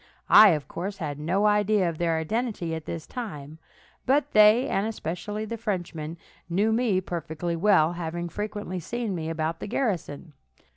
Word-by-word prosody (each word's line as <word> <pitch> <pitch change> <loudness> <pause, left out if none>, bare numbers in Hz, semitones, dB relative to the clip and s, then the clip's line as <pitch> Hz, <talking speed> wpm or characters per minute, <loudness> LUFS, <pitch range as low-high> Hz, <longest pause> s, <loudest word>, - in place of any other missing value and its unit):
I, 215 - +10
of 150 -2 -3
course, 195 +4 -5
had 150 -5 -4
no 185 +7 +1
idea 210 -2 +3
of 165 -2 -4
their 165 -1 +1
identity 200 0 -2
at 160 -1 -5
this 165 -2 -5
time; 155 - -7 0.5
but 285 +2 +2
they, 215 +4 +6
and 195 +2 0
especially 210 +1 -4
the 230 +2 -5
Frenchman, 175 -7 -4 0.3
knew 205 +6 +2
me 225 -5 +2
perfectly 170 -1 -4
well, 170 -3 +3
having 170 0 -4
frequently 205 0 -4
seen 230 +4 -3
me 160 -2 -3
about 165 0 -2
the - - -6
garrison. 175 - -3
180 Hz, 160 wpm, -26 LUFS, 160-210 Hz, 0.5 s, I